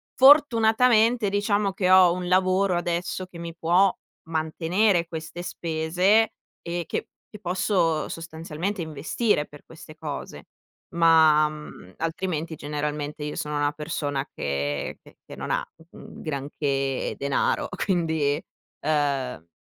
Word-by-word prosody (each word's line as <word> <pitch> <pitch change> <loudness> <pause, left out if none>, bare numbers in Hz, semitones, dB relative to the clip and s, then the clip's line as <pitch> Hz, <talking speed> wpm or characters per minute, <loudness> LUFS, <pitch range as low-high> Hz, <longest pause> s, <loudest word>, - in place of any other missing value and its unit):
fortunatamente, 235 -5 +5
diciamo, 205 0 +1
che 185 -2 0
ho 185 -2 +7
un 180 0 -4
lavoro 185 0 +2
adesso 175 +2 -2
che 175 - -12
mi 170 0 -7
può 175 +4 +3 0.4
mantenere 170 +3 +1
queste 165 +1 -7
spese, 180 +6 +1 0.3
e 170 -1 -4
che - - -3 0.2
che 210 - -11
posso 180 -3 0
sostanzialmente 165 +4 -5
investire 160 - 0
per 145 - -15
queste 160 -1 -13
cose. 150 -3 -7 0.5
Ma, 160 -2 +5
mhmm, 150 -11 -11
altrimenti 165 -1 -3
generalmente 150 0 -4
io 150 - -4
sono 150 0 -3
una 145 0 +1
persona 145 -2 -3
che 70 +1 -3
che - - -18
che - - -10
non - - -5
ha - - 0 0.3
un - - -12
granché 140 -2 -2
denaro, 140 0 0 0.2
quindi, 160 -6 +1 0.4
uhm, 140 - -1
165 Hz, 120 wpm, -25 LUFS, 150-185 Hz, 0.5 s, ho